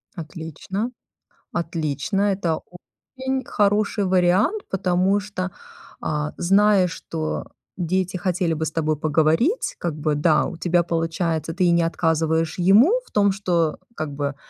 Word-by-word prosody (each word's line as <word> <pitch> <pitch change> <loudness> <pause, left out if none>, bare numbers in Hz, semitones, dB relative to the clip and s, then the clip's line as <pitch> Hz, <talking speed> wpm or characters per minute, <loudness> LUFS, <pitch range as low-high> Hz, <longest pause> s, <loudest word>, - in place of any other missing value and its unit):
Отлично, 170 - -5 0.6
отлично. 165 +2 -1
Это 170 -4 -1 0.6
очень 265 0 -2
хороший 205 0 +1
вариант, 190 - +2
потому 185 +1 +1
что, 190 -2 -4 0.5
а, 150 0 -2
зная, 195 +1 +4
что 165 -1 -4 0.3
дети 185 +1 -1
хотели 180 -1 0
бы 160 0 -2
с - - -2
тобой 155 -1 0
поговорить, 160 - +1
как 170 -3 -2
бы, 155 0 0
да, 150 +1 +3
у - - -5
тебя 175 0 +1
получается, 165 -1 -1
ты 185 +1 +1
и 175 - +4
не 170 0 +3
отказываешь 160 -1 0
ему 200 - +5
в - - -23
том, 205 -1 +3
что, 175 -5 0 0.2
как 155 -2 -4
бы, 140 -1 -3
175 Hz, 135 wpm, -23 LUFS, 160-195 Hz, 0.6 s, ему